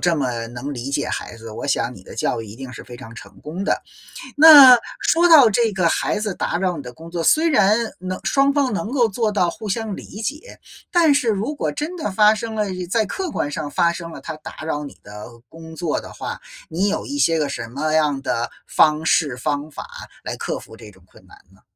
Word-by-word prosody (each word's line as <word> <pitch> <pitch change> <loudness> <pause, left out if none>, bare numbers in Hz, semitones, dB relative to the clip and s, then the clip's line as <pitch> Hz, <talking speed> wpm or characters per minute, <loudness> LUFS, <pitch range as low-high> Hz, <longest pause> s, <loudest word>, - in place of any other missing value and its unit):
这 175 -2 +2
么 120 -5 -2
能 130 +4 -6
理 125 +3 -5
解 145 +1 -1
孩 - - -5
子， 115 -1 -10
我 - - -7
想 125 -2 0
你 95 - -14
的 - - -12
教 115 - -1
育 110 - -10
一 105 +2 -11
定 130 -1 -8
是 - - -9
非 120 - -11
常 115 -1 -11
成 100 -3 -12
功 170 +6 -6
的。 - - 0 0.6
那 285 -5 +10 0.2
说 340 +2 +3
到 290 -9 +8
这 230 +2 +2
个 180 -3 +2
孩 - - 0
子 210 -2 -2
打 175 - -2
扰 180 -2 -1
你 - - -6
的 125 -1 -10
工 165 +3 -12
作， 170 -1 -3
虽 320 - +3
然 210 -5 +4 0.2
能 185 0 -4
双 275 0 +2
方 275 -4 +1
能 210 +1 -3
够 245 -4 +2
做 220 +2 0
到 180 -4 +2
互 215 +4 -8
相 215 0 -3
理 210 - -9
解， 295 - -6 0.3
但 335 -4 +4
是 280 -4 0
如 220 +6 0
果 - - -2
真 325 +5 -4
的 310 - -3
发 210 +2 +5
生 220 +1 -5
了， 215 - +1 0.3
在 220 +2 +1
客 370 - -4
观 145 - -3
上 150 0 -4
发 170 +2 +2
生 170 -1 -7
了， - - -9
他 155 - -7
打 155 - -10
扰 150 -2 -3
你 - - -11
的 105 +1 -10 0.2
工 160 0 -12
作 165 -2 -2
的 - - -11
话， - - -6 0.3
你 180 +5 0
有 205 - -2
一 285 0 -5
些 165 - +3
个 150 -2 -1
什 120 -4 -5
么 150 +6 -2
样 150 -3 +1
的 120 -3 -2 0.2
方 155 0 +2
式 145 -5 +2
方 145 +3 -3
法 150 - -8 0.4
来 - - -5
克 - - -3
服 110 - -12
这 110 -2 -12
种 95 -2 -22
困 - - -20
难 - - -17 0.2
呢？ 95 - -24
170 Hz, 255 characters per minute, -21 LUFS, 140-225 Hz, 0.6 s, 那